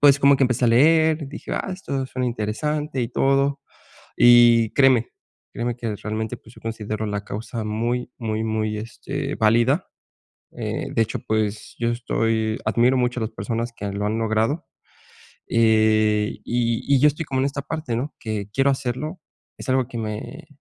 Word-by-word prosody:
Pues 145 Hz, -1 st, +6 dB
como 140 Hz, 0 st, +5 dB
que 135 Hz, -, +3 dB
empecé 125 Hz, -1 st, +1 dB
a -, -, +4 dB
leer, 155 Hz, +4 st, +4 dB
dije: 145 Hz, -, -7 dB
"Ah, 195 Hz, -, -2 dB
esto 140 Hz, -8 st, -3 dB
suena 125 Hz, -1 st, -3 dB
interesante 135 Hz, +6 st, -2 dB
y 115 Hz, -, -2 dB
todo". 135 Hz, +2 st, +1 dB, 0.6 s
Y 120 Hz, -2 st, +6 dB
créeme, 130 Hz, -4 st, +4 dB, 0.4 s
créeme 120 Hz, 0 st, -2 dB
que 115 Hz, -3 st, -3 dB
realmente, 110 Hz, +3 st, -4 dB
pues, 115 Hz, 0 st, -18 dB
yo -, -, -15 dB
considero 110 Hz, -1 st, -4 dB
la 105 Hz, -1 st, -3 dB
causa 110 Hz, +2 st, -5 dB
muy, 120 Hz, +4 st, -2 dB
muy, 110 Hz, -2 st, -2 dB
muy, 110 Hz, -1 st, -1 dB
este, 135 Hz, +5 st, -5 dB
válida. 120 Hz, -, +3 dB, 0.7 s
Eh, -, -, -3 dB
de 115 Hz, -, +2 dB
hecho, 110 Hz, 0 st, -1 dB
pues, 110 Hz, -1 st, -1 dB
yo 115 Hz, -, +1 dB
estoy 115 Hz, -2 st, 0 dB
admiro 125 Hz, +3 st, +3 dB
mucho 125 Hz, 0 st, 0 dB
a -, -, -4 dB
las 110 Hz, +1 st, -2 dB
personas 115 Hz, 0 st, -3 dB
que 100 Hz, -1 st, -4 dB
lo 100 Hz, +1 st, -3 dB
han 110 Hz, +2 st, 0 dB
logrado, 115 Hz, +8 st, 0 dB, 0.8 s
eh, 110 Hz, -2 st, +3 dB
y 115 Hz, -1 st, 0 dB
y -, -, +4 dB
yo 150 Hz, -, +6 dB
estoy 150 Hz, +3 st, -1 dB
como 130 Hz, -2 st, -1 dB
en 135 Hz, -, +1 dB
esta 140 Hz, 0 st, -2 dB
parte, 140 Hz, -4 st, -4 dB
¿no?, 140 Hz, +6 st, -3 dB
que 110 Hz, -3 st, -4 dB
quiero 135 Hz, +1 st, +3 dB
hacerlo. 135 Hz, +5 st, -3 dB, 0.4 s
Es -, -, -8 dB
algo 130 Hz, -1 st, +2 dB
que 125 Hz, -, -7 dB
me 110 Hz, +6 st, -6 dB
120 Hz, 175 wpm, -23 LUFS, 110-135 Hz, 0.8 s, Pues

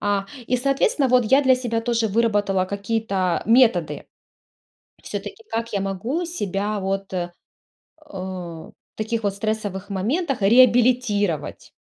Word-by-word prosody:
А, 200 Hz, -1 st, 0 dB, 0.2 s
и, 250 Hz, -, +1 dB
соответственно, 275 Hz, +1 st, +1 dB
вот 250 Hz, -1 st, +4 dB
я 270 Hz, +6 st, +4 dB
для 260 Hz, -1 st, +5 dB
себя 240 Hz, -3 st, -2 dB
тоже 230 Hz, -1 st, 0 dB
выработала 205 Hz, -3 st, +1 dB
какие-то 200 Hz, -2 st, -1 dB
методы 225 Hz, -9 st, +3 dB, 1.0 s
всё-таки, 450 Hz, -, -7 dB
как 230 Hz, -1 st, -3 dB
я 200 Hz, -, 0 dB
могу 225 Hz, -, -2 dB
себя, 205 Hz, -, -2 dB
вот, 195 Hz, 0 st, -3 dB
э, 175 Hz, -1 st, -2 dB, 1.7 s
таких 225 Hz, +1 st, -2 dB
вот 200 Hz, -2 st, 0 dB
стрессовых 205 Hz, -2 st, -3 dB
моментах 250 Hz, -, -1 dB
реабилитировать? 230 Hz, -, +3 dB
220 Hz, 115 wpm, -22 LUFS, 195-245 Hz, 1.7 s, для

